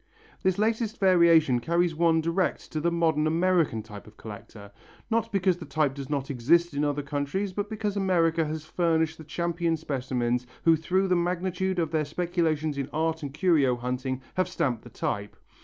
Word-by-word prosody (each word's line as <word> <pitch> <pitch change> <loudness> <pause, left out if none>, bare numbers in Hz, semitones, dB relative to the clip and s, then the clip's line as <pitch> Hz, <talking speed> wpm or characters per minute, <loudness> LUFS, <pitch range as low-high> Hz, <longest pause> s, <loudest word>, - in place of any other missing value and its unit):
This 190 -1 +1
latest 220 +1 0
variation 170 -9 +5
carries 170 +5 +1
one 165 0 +3
direct 170 +3 -1
to 155 - -2
the 170 +3 +1
modern 160 -3 +1
American 165 -8 +1
type 105 -2 -11
of 110 - -16
collector. 105 -1 -10 0.4
Not 230 0 0
because 190 -2 +2
the 175 - -8
type 145 -1 +1
does 140 -1 -7
not 140 -1 -2
exist 160 +7 +2
in 145 +1 -1
other 145 0 -1
countries, 145 +8 -2
but 205 +2 -3
because 210 -2 -3
America 170 -4 +2
has 155 0 -4
furnished 160 -1 0
the - - -8
champion 170 +1 -1
specimens 125 -4 -2 0.2
who 165 -1 +6
through 185 +5 0
the 185 - +2
magnitude 180 +1 -1
of 165 -3 0
their 155 -2 +1
speculations 160 -2 -1
in 135 - -3
art 160 +1 -1
and 145 -2 -5
curio 150 -5 +2
hunting 125 +2 -3
have 185 -1 0
stamped 130 -10 -1
the 120 - -13
type. 100 -2 -4
160 Hz, 180 wpm, -27 LUFS, 140-180 Hz, 0.4 s, who